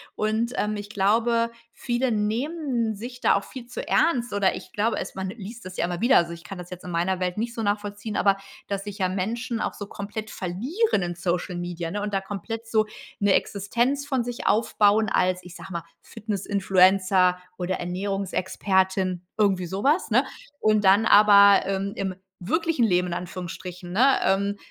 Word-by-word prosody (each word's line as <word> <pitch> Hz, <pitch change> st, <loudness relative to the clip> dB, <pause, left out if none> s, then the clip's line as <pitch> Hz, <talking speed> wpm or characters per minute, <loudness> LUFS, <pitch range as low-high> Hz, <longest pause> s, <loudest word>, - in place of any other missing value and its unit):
Und, 220 Hz, +3 st, 0 dB
ähm, 210 Hz, 0 st, 0 dB
ich 205 Hz, 0 st, -7 dB
glaube, 230 Hz, +4 st, +2 dB, 0.2 s
viele 245 Hz, +1 st, -1 dB
nehmen 235 Hz, +2 st, -1 dB
sich 245 Hz, +4 st, -8 dB
da -, -, +4 dB
auch 200 Hz, -, 0 dB
viel 255 Hz, -3 st, -9 dB
zu 245 Hz, -, -7 dB
ernst 245 Hz, -7 st, +2 dB
oder 200 Hz, -2 st, +2 dB
ich -, -, -9 dB
glaube 220 Hz, +3 st, 0 dB
es -, -, -6 dB
man 190 Hz, 0 st, -3 dB
liest 225 Hz, +3 st, -9 dB
das 185 Hz, 0 st, -8 dB
ja -, -, +1 dB
immer 175 Hz, 0 st, -4 dB
wieder. 240 Hz, +3 st, +5 dB
Also, 170 Hz, 0 st, +1 dB
ich 170 Hz, 0 st, -11 dB
kann 190 Hz, +2 st, -8 dB
das 180 Hz, 0 st, -9 dB
jetzt 180 Hz, -1 st, -9 dB
in 180 Hz, -, -7 dB
meiner 175 Hz, +2 st, 0 dB
Welt 180 Hz, 0 st, -1 dB
nicht 235 Hz, +2 st, -2 dB
so 225 Hz, -, -3 dB
nachvollziehen, 205 Hz, +1 st, -2 dB
aber 195 Hz, -1 st, +3 dB, 0.3 s
dass 200 Hz, -1 st, -3 dB
sich 205 Hz, -1 st, -7 dB
ja 185 Hz, -, +2 dB
Menschen 225 Hz, +5 st, -2 dB
auch -, -, -2 dB
so 205 Hz, -, -7 dB
komplett 210 Hz, +2 st, -6 dB
verlieren 230 Hz, -, -1 dB
in 175 Hz, 0 st, -3 dB
Social 175 Hz, +1 st, -2 dB
Media, 175 Hz, -1 st, -4 dB
ne, 205 Hz, +2 st, -3 dB
und 205 Hz, 0 st, -3 dB
da 195 Hz, -, +1 dB
komplett 210 Hz, +4 st, -6 dB
so 220 Hz, -1 st, +2 dB, 0.4 s
'ne 200 Hz, -1 st, +4 dB
Existenz 240 Hz, +10 st, 0 dB
von 265 Hz, -4 st, 0 dB
sich 240 Hz, 0 st, -6 dB
aufbauen 215 Hz, -1 st, +3 dB
als, 185 Hz, -1 st, +1 dB
ich 180 Hz, 0 st, -12 dB
sage 190 Hz, -, -10 dB
mal, 170 Hz, -1 st, -3 dB, 0.2 s
Fitness-Influencer 190 Hz, -3 st, +2 dB, 0.2 s
oder 185 Hz, +1 st, -1 dB
Ernährungsexpertin, 190 Hz, 0 st, -1 dB, 0.2 s
irgendwie 195 Hz, -4 st, +2 dB
so 190 Hz, +4 st, -4 dB
was, 300 Hz, +7 st, +2 dB
ne? -, -, +4 dB, 0.3 s
Und 215 Hz, -1 st, +3 dB
dann 200 Hz, +3 st, +5 dB
aber, 200 Hz, -1 st, +7 dB
ähm, 195 Hz, +1 st, -2 dB
im 190 Hz, -1 st, -3 dB, 0.3 s
wirklichen 320 Hz, -, +1 dB
Leben 180 Hz, -3 st, +2 dB
in 175 Hz, -, -3 dB
Anführungsstrichen, 180 Hz, 0 st, -6 dB
ne 260 Hz, +7 st, +5 dB
ähm, 200 Hz, +1 st, +1 dB
200 Hz, 185 wpm, -25 LUFS, 185-225 Hz, 0.4 s, aber